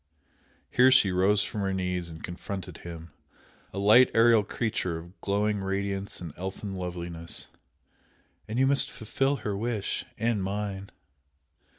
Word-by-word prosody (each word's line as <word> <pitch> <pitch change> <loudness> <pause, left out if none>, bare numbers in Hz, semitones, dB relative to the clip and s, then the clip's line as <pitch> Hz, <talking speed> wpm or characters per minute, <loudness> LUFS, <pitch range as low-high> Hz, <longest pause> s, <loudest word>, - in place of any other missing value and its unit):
Here 125 +1 +6
she 130 -7 +5
rose 95 +3 +3
from 105 - -4
her 95 -1 0
knees 90 -2 -2
and 80 -1 -10
confronted 95 +2 -6
him, 85 -2 -9 0.6
a - - -8
light 105 +6 +7
aerial 115 -1 +6
creature 100 -5 -2
of 85 +3 -12
glowing 105 +1 +1
radiance 100 0 -2
and 85 -5 -7
elfin 95 +2 -5
loveliness 85 -2 -5 1.0
"And 110 - -3
you 135 - +4
must 140 +1 +3
fulfil 135 +6 0
her 105 -2 0
wish 110 0 -2
and 115 -2 +1
mine!" 100 0 -3
100 Hz, 135 wpm, -28 LUFS, 90-110 Hz, 1.0 s, light